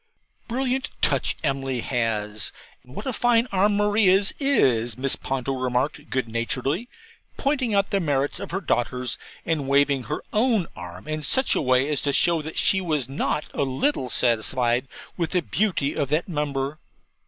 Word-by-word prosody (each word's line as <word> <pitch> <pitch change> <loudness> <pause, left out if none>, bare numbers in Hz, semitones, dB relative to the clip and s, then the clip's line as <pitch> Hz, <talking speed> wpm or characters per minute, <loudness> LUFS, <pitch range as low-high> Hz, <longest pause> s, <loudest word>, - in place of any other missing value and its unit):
'Brilliant 260 +2 -1
touch - - +1
Emily 135 -3 -1
has 110 -5 -1 0.3
what 125 - -9
a 260 - -2
fine 240 +1 +3
arm 200 +2 +2
Maria's 205 -2 +4
is,' 125 - +2
Mrs. 135 +2 +2
Ponto 135 0 -2
remarked 130 +4 -2
good 130 -2 -1
naturedly, 130 - -2 0.5
pointing 265 -6 0
out 200 0 +1
the 200 - +2
merits 145 -4 0
of - - -6
her 190 +3 -3
daughters, 125 -5 -1 0.3
and 155 -4 -1
waving 140 -2 +3
her 150 - -4
own 220 -4 +2
arm 90 +2 -9
in 155 0 -3
such 260 - +2
a - - +1
way 130 0 +3
as 150 -2 +2
to 140 - 0
show 170 +1 +3
that 155 +1 -7
she 190 - +4
was 155 -8 -1
not 140 +2 -2
a - - -2
little 135 - 0
satisfied 120 +2 +2 0.3
with 170 -1 -2
the 180 -2 +1
beauty 180 -9 0
of 145 -4 -1
that 155 +4 0
member. 145 -3 -2
145 Hz, 165 wpm, -24 LUFS, 130-195 Hz, 0.5 s, Maria's